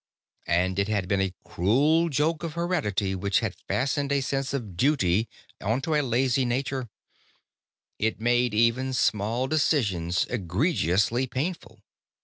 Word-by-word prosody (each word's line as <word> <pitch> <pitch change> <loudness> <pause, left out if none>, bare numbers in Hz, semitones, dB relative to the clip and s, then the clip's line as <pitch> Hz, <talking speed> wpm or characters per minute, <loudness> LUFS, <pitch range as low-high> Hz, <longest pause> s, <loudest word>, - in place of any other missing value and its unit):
But 90 +2 +1
it 100 - +1
had 100 -4 -1
been 100 0 +1
a 95 -1 -2
cruel 145 - +2
joke 150 +2 0
of 165 -3 -4
heredity 150 - -1
which 100 +3 0
had 110 -5 -2
fastened 140 +2 0
a 140 - +3
sense 135 +1 -2
of 115 -10 -4
duty 110 - +2 0.3
onto 135 - -1
a 150 - +3
lazy 130 0 +1
nature. 130 0 -2 1.1
It 110 +1 0
made 120 0 +1
even 120 +4 +2
small 115 +1 +1
decisions 115 - +1
egregiously 115 - 0
painful. 130 - -4
120 Hz, 130 wpm, -26 LUFS, 100-140 Hz, 1.1 s, a